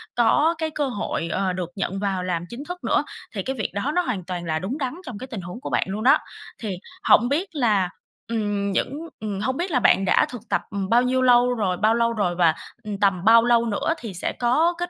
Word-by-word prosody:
có 295 +8 +3
cái 320 0 -1
cơ 295 -2 -1
hội, 205 -8 -3
ờ, 190 -1 0
được 180 -2 -4
nhận 195 -1 -2
vào 195 -2 -1
làm 175 -2 -2
chính 240 +4 -7
thức 355 0 -7
nữa. - - +2 0.3
Thì - - -2
cái 265 - -3
việc 215 - -2
đó 205 +9 -1
nó 360 - +4
hoàn 235 - -3
toàn 175 -1 -4
là 160 -1 -1
đúng 210 - -3
đắn 265 -4 -2
trong 240 - -6
cái 260 - -7
tình 230 -7 -6
huống 180 +8 -8
của - - -5
bạn - - +2
luôn 205 +3 -3
đó. 275 +5 +6 0.4
Thì 205 -5 -4 0.3
hổng 240 +3 +6
biết 330 +8 0
là, 210 -9 +2 0.4
ừm, 205 -3 -1
những 290 - -2
ừm, 210 -2 -4
hông 260 +6 -1
biết 350 +2 -2
là 260 - +3
bạn 195 -4 +4
đã - - +4
thực 245 -3 -7
tập, - - +1
ừm, 195 -2 -3
bao 235 +3 +5
nhiêu 255 +1 +1
lâu 250 -1 +5
rồi 195 -6 -1
bao 215 +3 +3
lâu 235 0 +2
rồi? 200 -6 0
Và, 170 -2 +4 0.3
ừm, 210 -2 -4
tầm 195 -3 +2
bao 230 +1 +7
lâu 235 -1 +3
nữa 230 +8 0
thì 225 -5 -7
sẽ 175 - -2
có 300 +9 +3
kết 350 0 -3
225 Hz, 250 wpm, -23 LUFS, 195-255 Hz, 0.4 s, bao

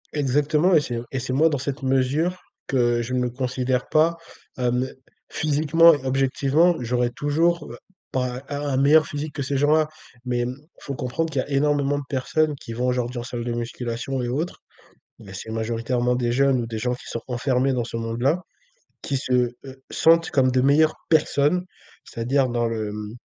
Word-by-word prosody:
Exactement, 150 +5 +2
et 155 - +5
c'est 125 -4 -4
un 115 - -5
et 135 - -2
c'est 130 +1 -4
moi 155 +5 +4
dans 145 - -1
cette 135 +1 -4
mesure, 135 +7 +1 0.3
que 120 -2 +2
je 120 +2 -4
me 125 -1 +1
considère 125 0 -2
pas, 165 +2 +3 0.4
hem 125 0 0 0.4
physiquement 155 +2 +4
et 145 -3 -3
objectivement, 135 +5 +2
j'aurais 120 0 0
toujours, 155 +3 0
heu, 120 - -9 0.3
pas 125 0 -2
a 145 0 -3
un 140 - 0
meilleur 145 +2 +5
physique 145 +1 -5
que 145 - -3
ces 140 +1 -2
gens-là. 150 +2 +3 0.4
Mais, 125 -1 -1
hem, 125 +1 -2 0.4
comprendre 125 +7 -2
qu'il 140 -3 0
y - - -6
a - - -14
énormément 145 0 +1
de 145 - -4
personnes, 150 +3 0
qui 115 - -8
vont 125 +2 -1
aujourd'hui 125 -1 -1
en - - -5
salle 120 -1 -5
de 120 - -2
musculation 120 +2 -3
et 120 - -2
autres. 150 +8 -3 0.6
Mais, 100 -4 -12
c'est 95 - -7
majoritairement 115 +2 -1
des 120 -1 0
jeunes, 135 0 +3
ou 115 - -4
des 115 -1 -5
gens 125 +3 -1
qui 125 - -9
sont 115 - -4
renfermés 130 +1 +1
dans 125 -2 0
ce 115 0 -5
monde-là. 120 +9 0 0.6
Qui 140 - -2
se, 130 - -4 0.3
heu, 135 0 -11
sentent 165 +1 +4
comme 130 -2 +3
de 130 0 +2
meilleures 150 +3 +4 0.2
personnes, 155 +2 +2 0.4
c'est-à-dire 130 +3 0
dans 120 -1 0
le, 110 -2 -2
hem, 105 +1 -6
130 Hz, 190 wpm, -23 LUFS, 120-145 Hz, 0.6 s, et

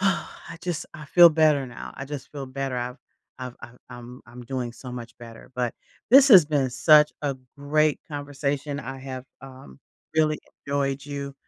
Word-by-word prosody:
"I 190 -3 -2
just 175 -3 -3
I 155 -3 -9
feel 170 +4 +8
better 155 -3 +3
now, 120 -2 -9
I 135 - -6
just 140 -1 -8
feel 140 -2 -5
better, 135 0 -4
I've 125 +1 -4 0.4
I've 125 -1 -6
I've 120 +1 -12
I'm 120 +1 -10
I'm 120 +1 -11
doing 125 -1 -4
so 125 +1 -10
much 120 -1 -8
better." 115 -1 -12
But, 125 -2 -1 0.4
this 270 +2 +8
has 190 - +9
been 140 -4 0
such 150 +3 +5
a 140 -2 -1 0.2
great 150 +1 +1
conversation, 145 -1 -3
I 135 - -7
have 130 -1 -7 0.2
um, 130 - -13 0.4
really 155 -1 +2 0.3
enjoyed 140 -1 -1
you. 140 -1 -6
140 Hz, 175 wpm, -25 LUFS, 125-150 Hz, 0.4 s, has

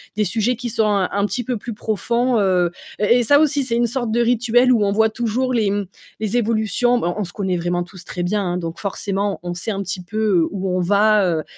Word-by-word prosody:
Des 210 - +1
sujets 230 +5 0
qui 240 0 -5
sont 220 0 +1
un 200 -3 +1
un 200 +1 +1
petit 245 - -3
peu 245 0 -2
plus 230 +2 -6
profonds, 235 +3 0
heu 180 -3 +2 0.3
et 235 +4 +4
et - - +1
ça 285 +5 +5
aussi, 290 -2 +2
c'est 235 -2 -2
une 240 0 +2
sorte 240 -2 -2
de 235 - +1
rituel 245 +1 +3
où 225 -4 +3
on 200 - +1
voit 220 +1 +3
toujours 240 +3 -1
les, 215 -4 +2
mmh, 205 -1 -1 0.3
les 220 +2 -1
évolutions. 230 +2 +1
Bon, 175 -6 -1
on 210 - -1
se 175 - -5
connaît 190 -3 -1
vraiment 175 +1 -1
tous 175 0 -12
très 175 - -5
bien, 200 +3 0
hein, 180 -1 -2
donc 165 -2 -5
forcément, 200 0 -2
on 175 0 -4
sait 175 +5 -4
un 200 0 -3
petit 185 0 -4
peu, 215 +5 -8
heu, 195 -7 +2
où 190 -2 -2
on - - 0
va, 205 +3 +3 0.2
heu 155 - -4
210 Hz, 255 wpm, -20 LUFS, 190-235 Hz, 0.3 s, ça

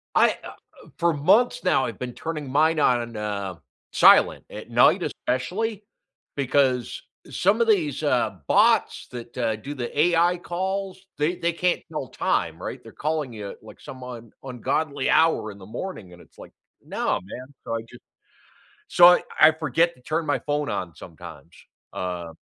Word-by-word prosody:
I, - - +5
uh - - -8 0.4
uh, - - -18
for 170 -1 +2
months 190 +12 +3
now, 130 - +2
I've 115 - -6
been 125 -1 -4
turning 155 -2 -5
mine 155 +4 +2
on, 120 -3 +1
uh, 100 -3 -4 0.4
silent, - - +6
at - - -9
night - - +4
especially, 205 - -3 0.5
because, 130 -2 +1 0.3
some 200 +5 +2
of 235 - +2
these, 165 -9 +1
uh, 120 -8 +1
bots - - +3
that, 120 -1 -9
uh, 115 -3 0
do 135 +7 -7
the 130 +1 -5
AI 175 +2 +3
calls, 190 +2 -4
they 150 +4 0
they 170 0 -1
can't 180 +2 0
tell 150 -4 -4
time, - - -1
right? - - -5
They're - - -12
calling 150 -4 -3
you 105 -2 -7
at, - - -15
like, 110 -1 -14
some 130 -1 -10
un 120 -2 -9
ungodly 135 +2 -2
hour 160 -9 +3
in 100 - -13
the 95 - -12
morning, 105 - -7
and 90 - -15
it's - - -22
like, - - -12 0.3
"No, - - -1
man." 125 +7 -9 0.2
So, - - -4
I 115 - -3
just 120 - -14 0.9
so, 175 -1 +8
I 180 - +6 0.2
I 155 - +8
forget 160 +2 +1
to 125 - -23
turn 160 +4 -1
my 145 - +2
phone 145 0 -1
on 90 -3 -4
sometimes, 85 -2 -12 0.4
uh 90 -2 -5
140 Hz, 175 wpm, -24 LUFS, 115-170 Hz, 0.9 s, so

